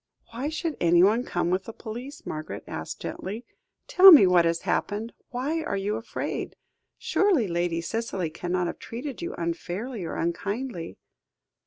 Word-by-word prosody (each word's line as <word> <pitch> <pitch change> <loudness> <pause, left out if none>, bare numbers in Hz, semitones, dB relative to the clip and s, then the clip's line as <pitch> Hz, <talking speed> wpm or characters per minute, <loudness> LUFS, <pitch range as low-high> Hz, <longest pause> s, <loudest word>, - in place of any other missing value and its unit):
"Why 250 +6 -3
should 315 0 -3
anyone 180 +8 +5
come 175 -6 -1
with 185 +1 0
the 225 - -7
police?" 245 +8 -8
Margaret 155 0 -5
asked - - -6
gently; 215 +6 -5 0.4
"tell 385 +1 +9
me 290 - +10
what 180 -2 +5
has 165 0 +1
happened 215 +3 -2 0.2
why 280 +6 -2
are 200 -10 -2
you 200 +2 -1
afraid? 225 +1 -4 0.4
Surely 355 - +2
Lady 170 -1 -1
Cicely 190 -4 -3
cannot 175 +2 -1
have 170 - -4
treated 255 +5 -6
you 345 - -4
unfairly 180 +7 -4
or 165 - -4
unkindly?" 180 - -3
205 Hz, 150 wpm, -26 LUFS, 175-250 Hz, 0.4 s, me